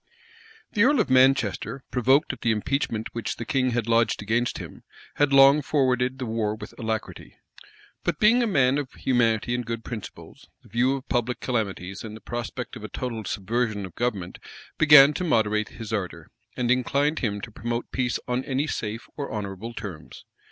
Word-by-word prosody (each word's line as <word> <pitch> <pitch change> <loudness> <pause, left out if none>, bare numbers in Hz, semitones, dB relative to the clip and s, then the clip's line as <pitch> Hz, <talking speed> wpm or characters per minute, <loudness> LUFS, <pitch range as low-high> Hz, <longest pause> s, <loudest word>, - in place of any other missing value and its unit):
The 205 - 0
earl 280 +2 +4
of 210 - +1
Manchester, 130 -1 +3
provoked 130 +3 +3
at - - -11
the 115 - +1
impeachment 115 0 -1
which 115 -2 -3
the - - -6
king 135 -4 +1
had 120 -2 -1
lodged 115 0 +2
against 120 +3 0
him, - - -9 0.4
had 145 -1 +3
long 140 +2 +7
forwarded 130 -3 +1
the 130 - -4
war 110 -2 -1
with 105 -1 -10
alacrity; 110 -2 -5 0.7
but - - -1
being 225 +4 +5
a 235 - +1
man 135 -7 +3
of 135 -3 -5
humanity 120 -2 +1
and 125 0 -1
good 115 0 -5
principles, 115 -4 -9 0.2
the - - -19
view 125 +5 +2
of 135 - -8
public 120 0 -1
calamities, 100 -6 -3
and 110 -1 -7
the - - -13
prospect 120 +1 -5
of 110 - -9
a 110 - -6
total 115 0 -4
subversion 110 +1 -1
of 90 - -11
government, 105 -7 -3 0.4
began 150 -2 +8
to 180 - -3
moderate 110 - +1
his 115 -1 -8
ardor, 90 -6 -4 0.3
and 125 -1 +1
inclined 140 +4 +1
him 105 -4 -1
to 115 +1 -8
promote 120 +2 -4
peace 125 -2 0
on 125 +1 -1
any 135 +2 0
safe 115 -5 -4
or 145 - -4
honorable 105 +1 -5
terms. 95 -9 -8
120 Hz, 180 wpm, -25 LUFS, 110-130 Hz, 0.7 s, began